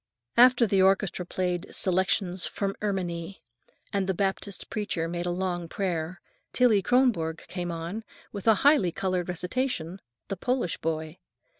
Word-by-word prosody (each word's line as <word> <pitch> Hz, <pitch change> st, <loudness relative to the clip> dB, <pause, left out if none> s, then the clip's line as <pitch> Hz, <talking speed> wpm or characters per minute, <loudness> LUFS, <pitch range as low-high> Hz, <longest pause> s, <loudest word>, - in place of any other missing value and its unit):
After 245 Hz, 0 st, +7 dB
the 195 Hz, -3 st, +3 dB
orchestra 190 Hz, -2 st, +2 dB
played 180 Hz, -2 st, -2 dB
"Selections 185 Hz, 0 st, +1 dB
from 195 Hz, -1 st, -2 dB
Erminie," 185 Hz, -3 st, -3 dB, 0.5 s
and 195 Hz, -2 st, 0 dB
the 190 Hz, -, +1 dB
Baptist 195 Hz, +1 st, -2 dB
preacher 200 Hz, -6 st, -1 dB
made 175 Hz, +1 st, -3 dB
a -, -, +1 dB
long 175 Hz, -1 st, -2 dB
prayer, 175 Hz, -2 st, -2 dB, 0.3 s
Tillie 235 Hz, -5 st, +4 dB
Kronborg 205 Hz, -10 st, +2 dB
came 175 Hz, -1 st, -4 dB
on 170 Hz, +7 st, -5 dB, 0.3 s
with 200 Hz, +1 st, -7 dB
a 220 Hz, -, +7 dB
highly 285 Hz, -, +5 dB
colored 185 Hz, 0 st, -1 dB
recitation, 180 Hz, -1 st, -2 dB, 0.3 s
"The 195 Hz, -, -4 dB
Polish 245 Hz, -3 st, -1 dB
Boy." 160 Hz, +1 st, -3 dB
185 Hz, 140 wpm, -27 LUFS, 175-205 Hz, 0.5 s, After